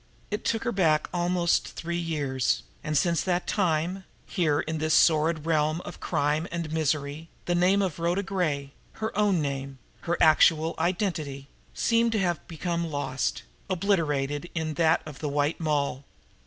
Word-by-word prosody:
It 210 - -2
took 225 -1 0
her 240 - 0
back 160 -7 +2
almost 175 0 +1
three 170 +1 -3
years, 140 - -1 0.2
and 150 -1 0
since 170 +2 +2
that 180 -1 0
time, 180 0 0 0.2
here 155 -4 +1
in 160 0 -3
this 155 0 +2
sordid 155 -1 +3
realm 155 0 +1
of - - -9
crime 150 +3 0
and 170 -2 -3
misery, 155 0 -1 0.2
the 175 - 0
name 185 +3 +3
of 175 -4 -3
Rhoda 175 +4 0
Gray, 155 -8 -1 0.2
her 220 0 -4
own 200 -6 +2
name, 135 -1 -4 0.3
her 170 - +2
actual 160 +1 +5
identity, 155 -7 -2 0.3
seemed 230 0 +2
to 215 - +1
have 175 -4 -1
become 170 0 -2
lost, 145 -3 -2 0.3
obliterated 160 -5 0
in 160 -1 -1
that 160 +1 +3
of 150 -4 -9
the 150 - -2
White 145 +2 0
Moll. 145 -4 -1
160 Hz, 155 wpm, -27 LUFS, 150-175 Hz, 0.3 s, actual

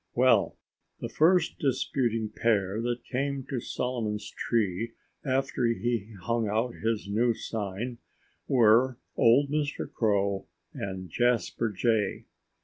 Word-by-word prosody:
Well, 120 -8 +4 0.4
the - - -4
first 170 +1 +3
disputing 120 -4 0
pair 105 -2 +1
that 120 0 -2
came 140 +1 -2
to 130 - -1
Solomon's 110 -4 -3
tree 115 0 -1 0.3
after 130 -2 0
he 115 -2 -1
hung 115 -1 0
out 115 +3 0
his 110 -2 -2
new 115 +3 +2
sign 110 +4 -4 0.5
were 120 +1 +4 0.2
old 135 +5 +4
Mr. 150 -1 -1
Crow 100 -3 +1 0.3
and 95 -1 -5
Jasper 120 +3 +1
Jay. 110 +1 0
115 Hz, 115 wpm, -28 LUFS, 105-125 Hz, 0.5 s, Well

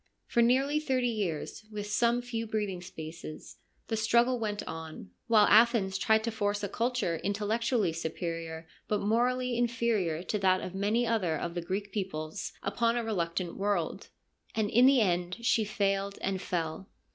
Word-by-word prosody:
For 235 - +2
nearly 270 +5 +3
thirty 260 -5 0
years, 195 -4 -3
with 210 -1 -4
some 235 +3 +1
few 230 -2 -4
breathing 210 -4 -2
spaces, 160 -2 -9 0.3
the 225 - -1
struggle 235 +3 +3
went 210 -2 -3
on, 160 - -7 0.2
while 215 -2 +6
Athens 215 -3 +5
tried 220 0 +3
to 230 - -1
force 205 -1 -1
a - - 0
culture 230 -5 -1
intellectually 210 0 0
superior 165 0 -4 0.2
but 210 -1 0
morally 245 +4 +1
inferior 230 -8 0
to 210 - -2
that 185 -1 +3
of 185 - -6
many 210 +5 +1
other 195 -9 +1
of 170 +2 -4
the 175 - -3
Greek 195 +4 -3
peoples 155 -6 -4
upon 230 +4 +1
a 240 - 0
reluctant 175 -5 -2
world: 195 -5 -1 0.5
and 215 -2 0
in 245 +3 +6
the 270 -3 +5
end 180 -2 0
she 225 - +3
failed 200 -1 -1
and 190 -1 -1
fell. 170 +1 -3
205 Hz, 160 wpm, -30 LUFS, 180-230 Hz, 0.5 s, while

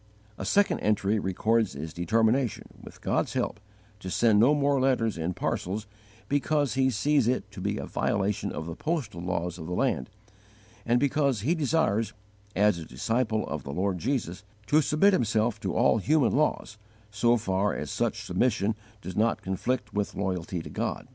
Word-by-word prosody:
A - - -4
second 205 0 +2
entry 105 0 +1
records 110 +2 +1
his 75 +3 -6
determination, 115 +8 0
with - - -13
God's - - 0
help, - - -2 0.4
to 95 - -6
send 110 +2 +3
no 130 +7 +5
more 140 -2 +2
letters 125 -5 +2
in 85 +2 -3
parcels 105 +4 -2 0.4
because 145 0 +1
he 130 0 +2
sees 130 +2 +2
it 120 -4 -1
to 100 -2 -8
be - - -1
a - - -4
violation 100 0 -1
of 80 - -5
the 85 - -5
postal 140 - -3
laws 90 -1 -3
of 80 - -7
the 90 - -3
land, 65 - 0 0.8
and 120 +1 +4
because 140 -4 +1
he 145 +10 +2
desires, 145 - +1 0.4
as 100 -3 +3
a 80 - -7
disciple 110 - -1
of - - -4
the - - -9
Lord 90 +3 -1
Jesus, 105 - -2 0.2
to 150 +8 +4
submit 155 +8 +3
himself 110 - +1
to - - -3
all - - +4
human 145 +3 +3
laws 135 -7 0 0.3
so 120 +4 +3
far 100 -1 0
as - - -4
such - - -1
submission 110 -4 +1 0.3
does 90 - -6
not 115 +2 +1
conflict 105 +3 -2
with 105 0 -2
loyalty 90 -3 -2
to - - -8
God. - - -3
110 Hz, 175 wpm, -27 LUFS, 95-130 Hz, 0.8 s, no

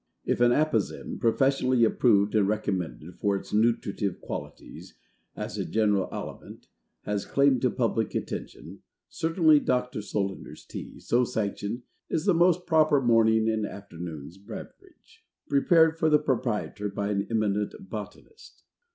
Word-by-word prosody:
If - - 0
an 120 0 +5
Apozem 135 -7 0
PROFESSIONALLY 130 +1 +2
approved 105 -3 +3
and 105 -3 +3
recommended 90 - -3
for 100 -1 +1
its 95 - -7
nutritive 105 -3 0
qualities, - - -8 0.4
as - - -5
a - - 0
general 105 -3 +1
aliment, - - -8 0.4
has 105 -1 -2
claim 140 -2 +3
to 125 - +2
public 115 -2 -1
attention, - - -6 0.3
certainly 160 -2 +3
Dr. 125 -4 -1
SOLANDER'S 100 -2 -4
TEA, - - -9
so 125 +1 +2
sanctioned, 110 +1 -3 0.3
is 160 - -1
the 195 - +4
most 175 +1 +3
proper 155 -3 +4
morning 110 -3 +3
and 110 -1 0
afternoon's 85 -5 -8
beverage. 355 - -12 0.2
Prepared 160 +3 +4
for 160 - +3
the 150 - +6
Proprietor 115 -7 -2
by 100 +1 -3
an 100 -1 -1
eminent 105 -2 0
Botanist. 105 - -10
115 Hz, 135 wpm, -27 LUFS, 100-140 Hz, 0.4 s, the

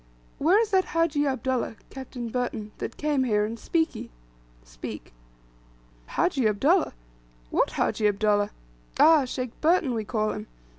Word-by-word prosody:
"Where 350 +8 +4
is 445 -2 0
that 380 -1 +4
Hajji 305 -3 +2
Abdullah 260 -3 -1 0.2
(Captain 260 -2 -6
Burton) 230 -3 -3
that - - -5
came 295 -3 +1
here, 210 -4 +2
and 225 +2 -4
Spiki?" 325 +5 -1 0.5
(Speke.) - - -9 0.9
"Hajji 270 -10 +1
Abdullah! 290 - +2 0.6
What - - +1
Hajji 210 - +1
Abdullah? 205 0 +2 0.5
Ah! 315 -4 +7
Sheikh 255 -1 -4
Burton 320 -5 +3
we 225 -2 -2
call 215 0 -1
him. 105 - -6
255 Hz, 135 wpm, -26 LUFS, 215-310 Hz, 0.9 s, Ah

